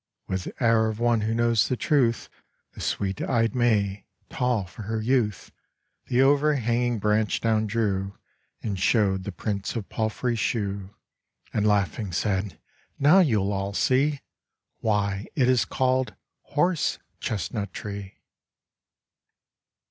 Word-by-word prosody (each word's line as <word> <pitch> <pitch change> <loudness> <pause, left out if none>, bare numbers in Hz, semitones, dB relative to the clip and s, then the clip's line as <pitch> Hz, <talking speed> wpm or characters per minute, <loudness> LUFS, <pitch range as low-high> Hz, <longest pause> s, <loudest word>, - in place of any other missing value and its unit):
With 95 -1 -3
air 115 -2 +3
of 110 0 -3
one 120 -2 +2
who 110 +1 0
knows 115 -1 +3
the 125 - -1
truth, 125 -7 +1 0.5
The - - -9
sweet 100 -1 -2
eyed 115 -2 +1
May, 105 -5 +1 0.2
tall 125 -6 0
for 95 +4 -11
her 110 +2 -3
youth, 110 -3 0 0.6
The 125 +2 +3
overhanging 125 -4 +2
branch 105 0 +1
down 110 -1 +1
drew, 100 -3 -1 0.5
And 100 -4 -2
shewed 95 -2 +2
the 100 - -3
prints 100 +3 -3
of 110 -4 -4
palfrey's 115 +2 -1
shoe 100 -2 -2 0.6
And 105 0 +1
laughing 100 0 +1
said: 95 -1 -1 0.4
"Now 150 +7 +6
you 110 - +2
all 100 0 -2
see 140 +5 +2 0.6
Why 100 -2 0
it 130 -4 +3
is 130 -2 +3
called 130 0 0 0.4
Horse 170 +1 +2 0.2
Chestnut 100 0 -3
tree." 100 -1 -7
110 Hz, 125 wpm, -26 LUFS, 100-120 Hz, 0.6 s, Now